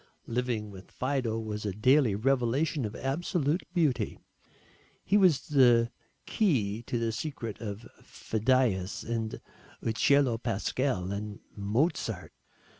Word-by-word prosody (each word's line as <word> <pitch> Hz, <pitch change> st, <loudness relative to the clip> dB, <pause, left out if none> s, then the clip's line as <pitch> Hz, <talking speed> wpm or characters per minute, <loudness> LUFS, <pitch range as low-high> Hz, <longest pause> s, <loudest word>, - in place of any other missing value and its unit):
Living 115 Hz, -3 st, -2 dB
with 95 Hz, -1 st, -12 dB
Fido 130 Hz, -4 st, -1 dB
was 105 Hz, -1 st, -4 dB
a 105 Hz, -, -1 dB
daily 125 Hz, +1 st, +4 dB
revelation 135 Hz, +4 st, +1 dB
of 105 Hz, -, -5 dB
absolute 155 Hz, +3 st, 0 dB
beauty. 160 Hz, -8 st, +1 dB, 0.9 s
He 195 Hz, -, +1 dB
was 185 Hz, -9 st, +4 dB
the 120 Hz, -5 st, +5 dB, 0.3 s
key 115 Hz, -, +1 dB
to 120 Hz, -, -1 dB
the 115 Hz, -1 st, 0 dB
secret 115 Hz, -4 st, -5 dB
of 105 Hz, 0 st, -6 dB
Phidias 110 Hz, -4 st, 0 dB
and 115 Hz, -1 st, -3 dB, 0.4 s
Ucello 120 Hz, +1 st, +3 dB
Pascal 110 Hz, -3 st, -1 dB
and 105 Hz, 0 st, -5 dB, 0.2 s
Mozart. 115 Hz, -, -1 dB
120 Hz, 115 wpm, -29 LUFS, 105-140 Hz, 0.9 s, the